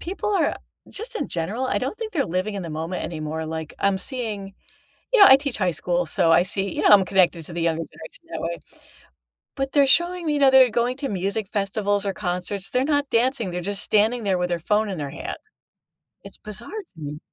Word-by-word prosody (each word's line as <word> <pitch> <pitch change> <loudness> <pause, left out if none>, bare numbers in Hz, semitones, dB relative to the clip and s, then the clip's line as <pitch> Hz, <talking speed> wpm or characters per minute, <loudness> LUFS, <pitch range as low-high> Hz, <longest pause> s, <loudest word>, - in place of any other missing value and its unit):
people 390 +4 -3
are, 360 - +1 0.3
just 450 +4 -6
in - - -3
general, 205 +10 -2
I - - 0
don't 270 +11 -3
think 445 -1 -5
they're 300 -6 +1
living 185 +5 -2
in 195 - -4
the 165 - -6
moment 165 +4 -4
anymore, 160 -1 -4
like, 160 -1 -6
I'm 200 -1 +1
seeing 210 -6 -4 0.6
you 450 - +6
know, 395 - +11
I 265 - +9
teach 280 -2 -3
high 185 -4 +1
school, 175 +2 -1
so, 165 +1 +2
I - - +6
see 195 0 -1
you - - -1
know, - - +4
I'm 200 -3 +7
connected 180 -4 +2
to 170 - -10
the 170 - -3
younger 165 0 0
generation 160 - -13
that - - -4
way. 170 +1 -3 1.0
But, 270 -1 -3
they're 285 -2 +5
showing 345 +5 +2
me 295 -1 +1
that 275 - +6
they're 260 -2 +7
going 240 +3 0
to 275 - -3
music 200 +1 -2
festivals 205 0 0
or 195 - 0
concerts, 180 +2 -3
they're 255 +1 +1
not 285 -1 +1
dancing, 235 -3 +1
they're 180 0 -3
just 200 +2 -2
standing 220 +2 +2
there 190 -2 +1
with 180 0 -1
their 175 -1 -1
phone 210 +5 +1
in 190 -4 -4
their 140 -2 -4
hand. - - -6 0.9
It's - - -11
bizarre 210 - -8
to 395 - -9
me. 150 0 -6
200 Hz, 225 wpm, -23 LUFS, 175-265 Hz, 1.0 s, know